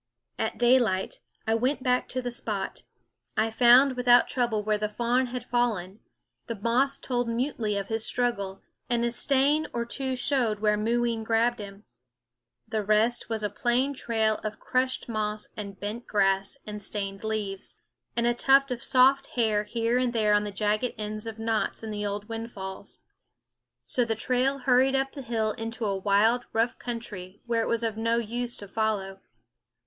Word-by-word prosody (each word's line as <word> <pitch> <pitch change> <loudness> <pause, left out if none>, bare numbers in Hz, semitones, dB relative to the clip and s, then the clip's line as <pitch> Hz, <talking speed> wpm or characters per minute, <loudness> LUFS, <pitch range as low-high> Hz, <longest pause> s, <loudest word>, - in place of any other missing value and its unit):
At - - -1
daylight 240 -6 +2 0.3
I 220 - +1
went 255 +4 0
back 250 -1 +1
to 255 0 -3
the 245 - -2
spot. 210 -4 -3 0.6
I 220 +1 +2
found 250 +4 +6
without 245 -1 +5
trouble 235 -4 0
where 210 0 0
the 210 0 -1
fawn 240 +4 +1
had 245 0 -5
fallen; 225 -6 -1 0.5
the 230 - -3
moss 240 +6 +1
told 245 -2 -2
mutely 230 -3 -1
of 200 -1 -3
his 225 0 -1
struggle; 200 -7 0 0.3
and 240 -1 +1
a 235 - 0
stain 280 +5 +2
or 235 0 -1
two 260 +2 -3
showed 250 -4 +1
where 210 0 +2
Mooween 230 +1 0
grabbed 230 +2 +1
him. 200 0 -9 0.8
The 220 -1 -1
rest 215 +4 +2
was 220 -2 -2
a 210 - 0
plain 245 +6 +1
trail 220 -4 0
of 215 0 -4
crushed 255 0 -1
moss 215 -2 -3
and 200 -2 -7
bent 215 +4 -5
grass 195 -1 +1
and 210 -1 -6
stained 195 -1 -4
leaves, 210 -3 -3 0.4
and 235 - +1
a 240 - +3
tuft 270 +2 +4
of 240 -1 -4
soft 265 +2 +4
hair 215 -3 +2
here 230 +3 0
and 250 -1 0
there 215 -2 +3
on 205 0 +3
the 205 - -4
jagged 210 +4 0
ends 215 +1 -5
of 225 -1 -6
knots 225 0 -1
in 220 - -5
the 205 0 -2
old 205 +1 -4
windfalls. 225 -4 -7 0.8
So 250 - +1
the 225 -1 -1
trail 255 +4 +1
hurried 260 +1 +3
up 270 0 0
the 280 - -8
hill 225 -3 -1
into 225 +1 -4
a 200 -2 0
wild, 210 +5 +2
rough 230 +2 0
country 205 -6 -7
where 235 -1 +1
it - - -1
was 230 0 +1
of 225 -2 -1
no 230 +1 +1
use 240 +1 -3
to 205 - -10
follow. 195 -2 -2
225 Hz, 175 wpm, -27 LUFS, 210-245 Hz, 0.8 s, found